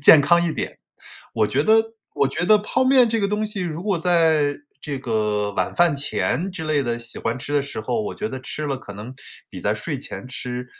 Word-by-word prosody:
健 145 Hz, +1 st, +9 dB
康 170 Hz, +4 st, +4 dB
一 -, -, 0 dB
点。 -, -, -5 dB, 0.6 s
我 110 Hz, -2 st, +3 dB
觉 135 Hz, +6 st, +1 dB
得 225 Hz, +2 st, +3 dB, 0.2 s
我 140 Hz, -, +2 dB
觉 175 Hz, -, -2 dB
得 215 Hz, -, +7 dB
泡 210 Hz, +5 st, 0 dB
面 255 Hz, -2 st, +5 dB
这 225 Hz, 0 st, 0 dB
个 200 Hz, -, +1 dB
东 210 Hz, +1 st, -1 dB
西 210 Hz, -2 st, -4 dB
如 170 Hz, -1 st, -4 dB
果 195 Hz, -4 st, 0 dB
在 160 Hz, -4 st, +3 dB, 0.2 s
这 140 Hz, -3 st, -4 dB
个 105 Hz, -4 st, -1 dB
晚 95 Hz, -2 st, -1 dB
饭 175 Hz, -3 st, +4 dB
前 160 Hz, +5 st, 0 dB
之 165 Hz, -3 st, -5 dB
类 155 Hz, -2 st, +1 dB
的 120 Hz, -2 st, -2 dB
喜 115 Hz, 0 st, -5 dB
欢 115 Hz, +2 st, -2 dB
吃 145 Hz, +2 st, -5 dB
的 145 Hz, -, +3 dB
时 140 Hz, -5 st, -5 dB
候 165 Hz, -, -1 dB
我 210 Hz, -, -4 dB
觉 215 Hz, -, -3 dB
得 130 Hz, -, -5 dB
吃 150 Hz, +3 st, -4 dB
了 140 Hz, -, -1 dB
可 105 Hz, -5 st, -10 dB
能 105 Hz, +6 st, -8 dB, 0.4 s
比 -, -, -9 dB
在 -, -, +1 dB
睡 -, -, -3 dB
前 95 Hz, -, -8 dB
吃， 125 Hz, 0 st, -5 dB
150 Hz, 250 characters per minute, -22 LUFS, 125-195 Hz, 0.6 s, 健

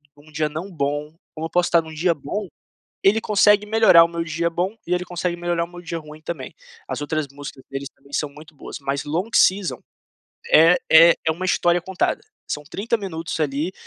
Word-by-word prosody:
num 145 Hz, +2 st, -19 dB
dia 155 Hz, +1 st, 0 dB
não 160 Hz, +6 st, -6 dB
bom, 145 Hz, -1 st, -3 dB, 0.2 s
como 160 Hz, +1 st, -4 dB
eu -, -, -22 dB
posso 175 Hz, 0 st, +1 dB
tá 170 Hz, -1 st, +5 dB
num 160 Hz, 0 st, -11 dB
dia 170 Hz, +3 st, +1 dB
bom. 180 Hz, +7 st, -5 dB, 0.6 s
Ele 210 Hz, +3 st, +4 dB
consegue 210 Hz, 0 st, +4 dB
melhorar 215 Hz, -6 st, +6 dB
o -, -, +2 dB
meu 170 Hz, 0 st, -3 dB
dia 170 Hz, +1 st, -1 dB
bom, 180 Hz, +5 st, -2 dB
e 180 Hz, -, -1 dB
ele 180 Hz, 0 st, -1 dB
consegue 175 Hz, 0 st, -3 dB
melhorar 175 Hz, -1 st, -1 dB
o -, -, -15 dB
meu 175 Hz, 0 st, -11 dB
dia 170 Hz, -1 st, -5 dB
ruim 150 Hz, 0 st, -12 dB
também. 155 Hz, -5 st, -6 dB, 0.3 s
As -, -, -4 dB
outras 155 Hz, 0 st, -2 dB
músicas 140 Hz, -1 st, -10 dB
deles 135 Hz, 0 st, -5 dB
também 140 Hz, 0 st, -22 dB
são 150 Hz, -, -1 dB
muito 150 Hz, +2 st, -15 dB
boas, -, -, -8 dB
mas 140 Hz, 0 st, -2 dB
Long 170 Hz, +8 st, -2 dB
Season 190 Hz, -1 st, +3 dB, 0.7 s
é 165 Hz, +3 st, +7 dB
é 165 Hz, +2 st, +8 dB
é 160 Hz, -, +4 dB
uma 175 Hz, +4 st, -6 dB
história 175 Hz, -1 st, +2 dB
contada. 190 Hz, +1 st, -1 dB, 0.3 s
São 150 Hz, -, -3 dB
30 215 Hz, +10 st, -2 dB
minutos 175 Hz, -6 st, -5 dB
ali, 150 Hz, +4 st, -1 dB
165 Hz, 210 wpm, -22 LUFS, 150-180 Hz, 0.7 s, é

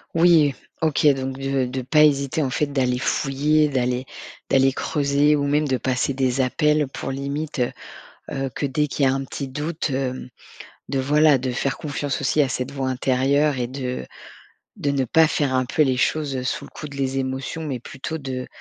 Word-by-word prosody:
Oui, 165 Hz, -4 st, +5 dB, 0.3 s
OK, 155 Hz, -1 st, +2 dB
donc 135 Hz, 0 st, -4 dB
de 135 Hz, -1 st, 0 dB
de 130 Hz, +1 st, -3 dB
pas 150 Hz, +5 st, +4 dB
hésiter, 140 Hz, 0 st, +2 dB
en 135 Hz, -, -1 dB
fait, 130 Hz, +4 st, 0 dB
d'aller 130 Hz, -3 st, 0 dB
fouiller, 150 Hz, +3 st, +1 dB
d'aller 125 Hz, -2 st, 0 dB, 0.5 s
d'aller, 135 Hz, 0 st, +4 dB
creuser 145 Hz, +1 st, +2 dB
ou 140 Hz, -, 0 dB
même 150 Hz, +2 st, +2 dB
de 130 Hz, -, +2 dB
passer 130 Hz, +2 st, -1 dB
des 130 Hz, 0 st, +1 dB
appels 150 Hz, +3 st, +2 dB
pour, 135 Hz, -, -5 dB
limite, 140 Hz, +2 st, -4 dB
heu 125 Hz, -, +1 dB, 0.8 s
heu, -, -, -2 dB
que -, -, -3 dB
dès 145 Hz, +2 st, +1 dB
qu'il 140 Hz, -1 st, 0 dB
y -, -, +5 dB
a -, -, +2 dB
un 135 Hz, 0 st, -2 dB
petit 135 Hz, +1 st, -5 dB
doute, 155 Hz, +5 st, -3 dB
hem, 130 Hz, -1 st, -3 dB, 0.6 s
de, 135 Hz, -, -2 dB
voilà, 150 Hz, +2 st, +4 dB
de 130 Hz, 0 st, -3 dB
faire 135 Hz, +2 st, -1 dB
confiance 145 Hz, -2 st, -3 dB
aussi 145 Hz, +2 st, +2 dB
à 140 Hz, -, +1 dB
cette 130 Hz, +1 st, -3 dB
voix 135 Hz, -2 st, -2 dB
intérieure 135 Hz, +3 st, +1 dB
et 120 Hz, -, -1 dB
de 130 Hz, 0 st, -4 dB, 0.7 s
de 145 Hz, -, 0 dB
ne 140 Hz, -1 st, +1 dB
pas 160 Hz, +6 st, +4 dB
faire 145 Hz, -4 st, 0 dB
un 130 Hz, 0 st, +2 dB
peu 140 Hz, -, 0 dB
les 130 Hz, -4 st, +3 dB
choses 140 Hz, 0 st, 0 dB
sous 130 Hz, -, -2 dB
le -, -, -11 dB
coup 150 Hz, -, -8 dB
de 140 Hz, -, -10 dB
les 135 Hz, -1 st, -1 dB
émotions, 135 Hz, +4 st, -3 dB
mais 130 Hz, -5 st, -4 dB
plutôt 135 Hz, +5 st, -6 dB
de 130 Hz, -3 st, -5 dB
135 Hz, 200 wpm, -23 LUFS, 130-150 Hz, 0.8 s, Oui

